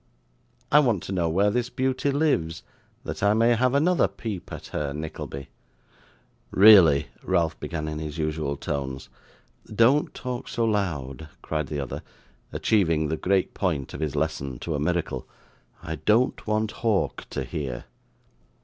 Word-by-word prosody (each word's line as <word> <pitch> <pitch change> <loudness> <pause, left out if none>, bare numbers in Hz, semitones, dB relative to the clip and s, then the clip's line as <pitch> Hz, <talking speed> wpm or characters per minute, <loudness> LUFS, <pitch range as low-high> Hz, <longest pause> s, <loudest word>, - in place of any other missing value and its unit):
I 150 - +8
want 120 - +2
to - - -6
know 85 -3 +1
where 100 +5 +3
this 125 +2 -1
beauty 130 +2 0
lives, 135 - 0 0.4
that - - -5
I 100 +1 +4
may 115 +2 +4
have 125 +3 +2
another 170 +5 +3
peep 105 -7 -6
at - - -7
her, 70 -2 -3
Nickleby.' 75 -3 -6 1.0
'Really 95 -8 +7
' - - -29
Ralph 85 -3 0
began 75 -2 -4
in 75 0 -4
his 75 0 -5
usual 75 -2 -2
tones. 65 -2 -4 0.6
'Don't 120 +7 +4
talk 125 -1 -5
so 115 - 0
loud,' 80 - -2
cried 75 -2 -2
the 75 - -3
other, 70 - -4 0.5
achieving 80 -8 +2
the 80 - 0
great 95 +3 +1
point 80 -9 -2
of - - -6
his 75 -3 -2
lesson 70 -3 -2
to 85 - -3
a 75 - -1
miracle. 85 +3 -1 0.6
'I 80 - -4
don't 115 - +1
want 110 0 0
Hawk 110 -4 -1
to - - -3
hear. 65 -2 -5
85 Hz, 155 wpm, -25 LUFS, 75-110 Hz, 1.0 s, I